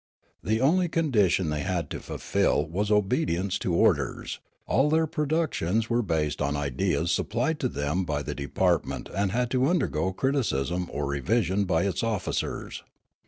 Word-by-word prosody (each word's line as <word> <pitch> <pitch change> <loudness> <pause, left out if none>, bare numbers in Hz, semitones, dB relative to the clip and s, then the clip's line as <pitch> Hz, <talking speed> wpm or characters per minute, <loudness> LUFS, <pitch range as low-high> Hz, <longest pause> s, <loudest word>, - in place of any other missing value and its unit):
The 110 +1 0
only 175 +7 +3
condition 105 - +2
they 75 - -1
had 90 -3 -1
to - - -4
fulfil 75 - 0
was 100 +6 -2
obedience 100 - +1
to 90 - -1
orders; - - +1 0.3
all 135 +3 +2
their 160 +1 +3
produc 155 +2 0
tions 110 +7 0
were 120 +1 +3
based 80 -8 -1
on 70 0 0
ideas 80 +5 0
supplied 125 +12 0
to 130 - +1
them 75 -1 -1
by 75 -4 -2
the - - -4
6 - - -6
82 70 - -5
Riallaro - - -27
department 90 -4 +1
and 100 -1 +1
had 120 +2 0
to 130 0 +2
undergo 95 - +1
criticism 90 - 0
or 70 0 -2
revision 95 - 0
by 85 -2 +1
its 100 -3 -1
officers. 110 -5 -2
95 Hz, 170 wpm, -27 LUFS, 80-125 Hz, 0.3 s, only